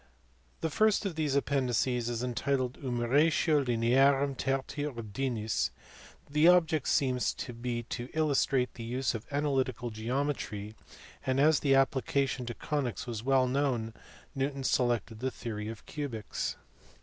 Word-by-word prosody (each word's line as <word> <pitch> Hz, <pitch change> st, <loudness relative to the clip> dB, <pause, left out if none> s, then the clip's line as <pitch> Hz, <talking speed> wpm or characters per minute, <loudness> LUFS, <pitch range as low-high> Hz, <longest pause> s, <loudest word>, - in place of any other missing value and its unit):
The 160 Hz, -, -1 dB
first 215 Hz, +4 st, +3 dB
of 195 Hz, -, -1 dB
these 155 Hz, -3 st, -1 dB
appendices 125 Hz, -3 st, +1 dB
is 120 Hz, 0 st, -2 dB
entitled 125 Hz, +1 st, -1 dB
jBnumeratio 140 Hz, +4 st, +2 dB
Linea 120 Hz, +4 st, +4 dB
rum 140 Hz, 0 st, 0 dB
Tertii 135 Hz, +2 st, -2 dB
Ordinis*, 115 Hz, -1 st, -2 dB, 0.6 s
the 150 Hz, +3 st, +4 dB
object 165 Hz, -5 st, +4 dB
seems 130 Hz, -3 st, +1 dB
to 125 Hz, -, -6 dB
be 120 Hz, 0 st, -3 dB
to 120 Hz, +1 st, -5 dB
illustrate 140 Hz, -4 st, +2 dB
the 115 Hz, -, -8 dB
use 125 Hz, +3 st, -1 dB
of 115 Hz, 0 st, -6 dB
analytical 135 Hz, -4 st, -1 dB
geometry, 110 Hz, -2 st, -3 dB, 0.5 s
and 130 Hz, 0 st, 0 dB
as 155 Hz, +1 st, +5 dB
the 135 Hz, -2 st, +3 dB
application 135 Hz, -1 st, +1 dB
to 120 Hz, -, -4 dB
conies 140 Hz, -7 st, -2 dB
was 115 Hz, -3 st, -4 dB
well 130 Hz, +1 st, +3 dB
known 125 Hz, -4 st, 0 dB, 0.4 s
Newton 135 Hz, 0 st, -2 dB
selected 120 Hz, -4 st, 0 dB
the 130 Hz, +2 st, -1 dB
theory 110 Hz, -4 st, -5 dB
of 110 Hz, -1 st, -8 dB
cubics. 135 Hz, -9 st, -4 dB
130 Hz, 135 wpm, -30 LUFS, 120-140 Hz, 0.6 s, as